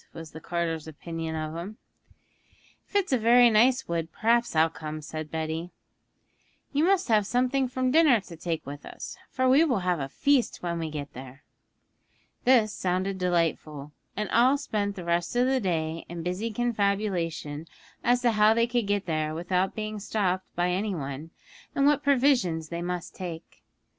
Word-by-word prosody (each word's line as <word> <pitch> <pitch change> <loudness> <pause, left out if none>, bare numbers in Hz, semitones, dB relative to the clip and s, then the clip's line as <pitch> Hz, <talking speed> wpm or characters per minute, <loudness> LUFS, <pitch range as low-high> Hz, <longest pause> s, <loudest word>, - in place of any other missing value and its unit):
was 165 -2 -9
the 160 - -10
carter's 165 -2 -2
opinion 165 +1 -5
of 155 0 -4
him. 190 +6 -6 1.1
'If - - -21
it's 385 -8 +2
a 255 - +3
very 240 +1 +6
nice 245 +4 +4
wood 165 -1 -2
perhaps 235 0 +1
I'll 160 +1 +5
come,' 155 -1 -7
said 155 0 -6
Betty. 160 +2 -3 1.0
'You 295 +3 +3
must 385 0 +3
save 215 -3 +2
something 255 +2 +1
from 255 0 -1
dinner 300 -6 +5
to 175 -3 -11
take 165 0 -4
with 145 +1 -8
us, - - -8
for 260 0 0
we 270 +5 +6
will 250 - +1
have 180 -2 0
a 135 -1 -4
feast 275 - +1
when 170 -1 -2
we 160 -1 -3
get 145 -2 -6
there.' 130 +2 -11 1.0
This 235 -4 +4
sounded 190 +1 -1
delightful, 165 -5 -1 0.3
and 210 0 -1
all 255 +4 +5
spent 205 -7 -2
the 180 - -7
rest 170 +4 0
of 245 +1 +3
the 265 0 +2
day 165 -5 -2
in 170 -1 -6
busy 180 +6 -2
confabulation 200 -9 -1 0.4
as 245 +1 +2
to 240 - +4
how 215 0 +4
they 230 0 +3
could 240 -3 -1
get 205 0 0
there 155 -2 -1
without 180 +3 0
being 215 -1 -4
stopped 190 -3 -1
by 175 +1 +1
any 195 +2 -1
one, 140 +1 -5 0.5
and 275 - +3
what 290 0 +4
provisions 245 - +2
they 170 0 -4
must 175 0 -4
take. 170 -4 -8
185 Hz, 175 wpm, -27 LUFS, 165-240 Hz, 1.1 s, very